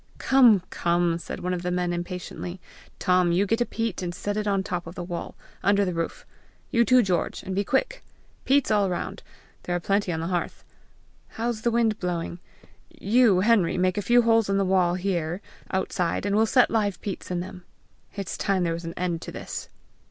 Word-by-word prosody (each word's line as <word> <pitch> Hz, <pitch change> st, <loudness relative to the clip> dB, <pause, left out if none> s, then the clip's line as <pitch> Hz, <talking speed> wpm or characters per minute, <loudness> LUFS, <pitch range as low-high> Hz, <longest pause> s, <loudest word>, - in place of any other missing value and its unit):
"Come, 240 Hz, -8 st, +5 dB
come!" 170 Hz, -1 st, +1 dB
said -, -, -7 dB
one 180 Hz, 0 st, -1 dB
of 180 Hz, -, -2 dB
the 180 Hz, -, -2 dB
men 180 Hz, -1 st, 0 dB
impatiently. 175 Hz, +1 st, -5 dB, 0.4 s
"Tom, 180 Hz, -2 st, +3 dB
you 185 Hz, +4 st, +2 dB
get 225 Hz, +4 st, 0 dB
a 240 Hz, -, +1 dB
peat, 225 Hz, -5 st, -3 dB
and 175 Hz, -1 st, -4 dB
set 205 Hz, 0 st, -3 dB
it 210 Hz, 0 st, -2 dB
on 195 Hz, -1 st, +2 dB
the -, -, -6 dB
top 180 Hz, -3 st, -4 dB
of 165 Hz, -, -9 dB
the 180 Hz, -, -5 dB
wall, 175 Hz, -1 st, -6 dB, 0.3 s
under 200 Hz, 0 st, +3 dB
the 180 Hz, -, -2 dB
roof. 165 Hz, 0 st, -4 dB, 0.5 s
You, 235 Hz, -1 st, +4 dB
too, 255 Hz, +1 st, +5 dB
George! 180 Hz, -4 st, -1 dB
and 190 Hz, -, -4 dB
be 200 Hz, +2 st, +1 dB
quick. -, -, 0 dB, 0.4 s
Peats 275 Hz, -2 st, +2 dB
all 205 Hz, -2 st, +3 dB
around! 180 Hz, -2 st, -4 dB, 0.4 s
there 175 Hz, -, -2 dB
are -, -, 0 dB
plenty 195 Hz, +1 st, 0 dB
on 160 Hz, -, -2 dB
the 165 Hz, -, -3 dB
hearth! 175 Hz, -1 st, -3 dB, 0.6 s
How's 230 Hz, -1 st, -3 dB
the 235 Hz, -, +2 dB
wind 230 Hz, -2 st, +1 dB
blowing? 175 Hz, -1 st, -3 dB, 0.5 s
You, 235 Hz, -, +3 dB
Henry, 205 Hz, -5 st, +3 dB
make 185 Hz, 0 st, +2 dB
a 205 Hz, -, -1 dB
few 240 Hz, +4 st, +4 dB
holes 225 Hz, -2 st, +3 dB
in 195 Hz, -, +2 dB
the 195 Hz, -, +2 dB
wall 185 Hz, -2 st, +2 dB
here, 175 Hz, -2 st, -2 dB, 0.3 s
outside, 185 Hz, -2 st, -1 dB
and 200 Hz, 0 st, +1 dB
we'll 220 Hz, +1 st, +4 dB
set 250 Hz, +2 st, +4 dB
live 205 Hz, -5 st, 0 dB
peats 195 Hz, -3 st, -5 dB
in 180 Hz, -1 st, -1 dB
them. 180 Hz, 0 st, -7 dB, 0.5 s
It's 200 Hz, -4 st, -4 dB
time 195 Hz, -3 st, +1 dB
there 165 Hz, -1 st, 0 dB
was 170 Hz, +1 st, -6 dB
an 165 Hz, -, -6 dB
end 175 Hz, -2 st, -1 dB
to -, -, -7 dB
this!" -, -, -6 dB
190 Hz, 210 wpm, -25 LUFS, 175-215 Hz, 0.6 s, Come